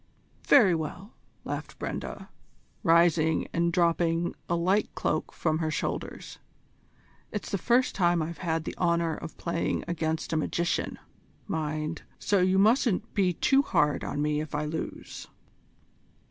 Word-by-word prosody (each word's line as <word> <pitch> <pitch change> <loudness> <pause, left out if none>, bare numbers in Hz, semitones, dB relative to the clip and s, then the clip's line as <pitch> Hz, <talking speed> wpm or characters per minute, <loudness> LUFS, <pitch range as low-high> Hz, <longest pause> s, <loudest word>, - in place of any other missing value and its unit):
"Very 215 -10 +7
well," 170 +6 -4 0.3
laughed - - -5
Brenda, - - -5 0.5
rising 165 -1 +3
and 170 0 +2
dropping 170 -1 +1 0.2
a 170 - +2
light 185 +5 +1
cloak 155 - -1
from 160 -1 -1
her 160 -1 0
shoulders. - - -4 0.9
"It's 210 - -5
the 195 - 0
first 245 +6 +2
time 175 -2 +2
I've 160 +1 -4
had 165 -3 -1
the - - -5
honour 170 -2 +2
of 165 +1 -9
playing 170 -1 -1
against 160 -1 -2
a - - +2
magician, 170 +2 -1 0.5
mind, 155 0 -3 0.2
so 200 - +1
you 185 +1 +3
mustn't 220 0 +3
be 190 -4 +2
too 270 - +3
hard 150 - +1
on 145 - -2
me 150 0 0
if 155 -1 -6
I 150 +1 -1
lose." 160 +1 -6
170 Hz, 140 wpm, -28 LUFS, 160-185 Hz, 0.9 s, Very